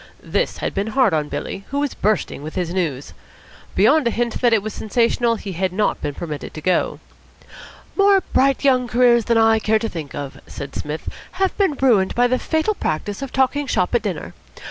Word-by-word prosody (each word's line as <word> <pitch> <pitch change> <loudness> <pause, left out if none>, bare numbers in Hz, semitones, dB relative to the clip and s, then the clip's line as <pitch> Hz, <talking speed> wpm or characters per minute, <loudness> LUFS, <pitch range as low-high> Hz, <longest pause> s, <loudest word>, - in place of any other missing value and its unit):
This - - -1
had - - -3
been 200 +2 -1
hard 255 -3 +2
on 150 -2 0
Billy, 195 - -5
who 280 - -1
was 290 -2 -1
bursting 210 -7 -1
with 155 +2 -7
his 175 -2 -2
news. 150 -8 -2 0.6
Beyond 260 +7 +4
a - - +4
hint 235 0 -2
that 240 -2 +4
it 220 -3 +3
was 215 - -4
sensational 235 +1 +1
he 205 -2 -6
had 185 +1 -1
not 205 +3 0
been 145 - -3
permitted 155 -4 -6
to - - -5
go. 185 +3 0 1.0
"More 395 -1 +5
bright 275 +1 +3
young 255 -3 +3
careers 240 -1 +4
than 235 -1 +2
I 225 0 +4
care 220 0 +2
to 225 +1 -2
think 155 -5 -7
of," 140 -2 -6
said 140 0 -8
Psmith, 150 +2 -5 0.3
"have 380 0 0
been 390 -6 +2
ruined 220 -8 +3
by 245 - +4
the 250 +1 +1
fatal 320 +7 0
practice 200 - -3
of 275 -2 -5
talking 275 +2 +1
shop 180 -5 0
at 240 - +3
dinner. 165 - -4
220 Hz, 205 wpm, -21 LUFS, 180-255 Hz, 1.0 s, More